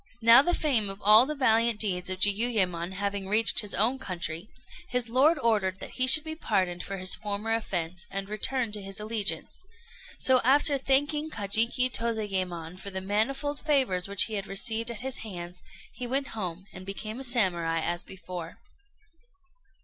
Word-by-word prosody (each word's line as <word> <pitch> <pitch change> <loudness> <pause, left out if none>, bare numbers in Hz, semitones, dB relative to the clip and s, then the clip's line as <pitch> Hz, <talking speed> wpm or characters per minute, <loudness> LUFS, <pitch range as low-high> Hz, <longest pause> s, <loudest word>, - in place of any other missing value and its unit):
] 245 - -30
Now 230 +3 +8
the 350 +5 0
fame 240 -10 0
of 195 0 -7
all 215 +5 +7
the 305 - -4
valiant 230 -4 +2
deeds 185 -4 -1
of 185 0 -3
Jiuyémon 195 -5 0
having 200 0 -3
reached 215 +1 +4
his 210 -3 0
own 230 +8 +1
country, 175 -3 -5 0.4
his 245 -2 -1
lord 280 +7 +3
ordered 210 -7 0
that - - -7
he 255 0 +2
should 300 +4 +9
be 315 0 -6
pardoned 185 - -1
for 195 - -6
his 185 0 -1
former 210 +2 -3
offence, 175 -6 -3
and 195 0 -5
return 225 +3 -2
to 210 -1 -4
his 195 +1 -4
allegiance; 210 - -2 0.5
so, 260 -1 +2
after 280 +2 +3
thanking 290 +3 +1
Kajiki 225 +2 +2
Tozayémon 185 -7 -2
for 200 - -6
the 190 -1 -4
manifold 235 +9 -2
favours 260 - 0
which 200 -1 +4
he 220 - -3
had 200 -1 -3
received 225 +4 +1
at 230 -3 -7
his 265 0 -3
hands, 180 -4 -8 0.3
he 250 - -5
went 270 +2 -2
home, 185 -4 -6
and 185 - -10
became 215 +4 -6
a - - -7
Samurai 180 -10 +1
as 175 +2 -2
before. 180 -3 -9
210 Hz, 175 wpm, -27 LUFS, 190-245 Hz, 0.5 s, should